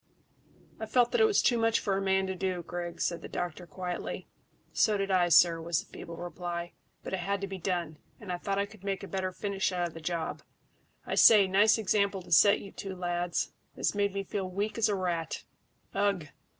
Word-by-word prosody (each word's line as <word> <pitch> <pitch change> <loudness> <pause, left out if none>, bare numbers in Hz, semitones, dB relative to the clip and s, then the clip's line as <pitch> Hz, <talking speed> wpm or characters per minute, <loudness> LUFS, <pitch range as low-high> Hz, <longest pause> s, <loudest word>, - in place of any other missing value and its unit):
"I 220 - -4
felt 245 +2 +3
that 475 - +2
it - - +7
was 425 -2 +3
too 240 -2 +3
much 225 0 +3
for 195 -2 0
a 195 - -1
man 190 0 +2
to 190 - -2
do, 185 -1 -2
Griggs," 175 -1 -4
said 170 -1 -2
the - - -8
doctor 175 0 -4
quietly. 180 0 -5 0.5
"So 215 -2 +3
did 195 0 -1
I, 180 -2 +3
sir," 165 0 +6
was 170 0 0
the - - -25
feeble 170 -1 -8
reply; 175 0 -5 0.3
"but - - -6
it 190 - 0
had 200 +2 -1
to - - -1
be 190 -1 -6
done, 170 -4 -2 0.2
and 205 -4 -7
I 175 - -3
thought 195 +2 -2
I 200 - +1
could 215 -2 -16
make 195 0 -2
a - - -6
better 190 -1 -2
finish 195 0 -1
out 175 -1 0
of - - -16
the 165 - -9
job. 165 0 -3 0.6
I - - -3
say, 210 -3 +8
nice 200 +4 +4
example 200 -2 +1
to 175 - -15
set 200 +6 +6
you 200 - -10
two 195 -1 -6
lads. 175 -1 -1 0.2
It - - -10
has - - +2
made 200 -1 0
me 195 - -1
feel 195 0 -3
as 185 - -10
weak 210 +4 -2
as 220 -1 +3
a 205 - +1
rat. 170 -4 -2 0.5
Ugh! 200 -6 0
190 Hz, 230 wpm, -30 LUFS, 175-200 Hz, 0.6 s, say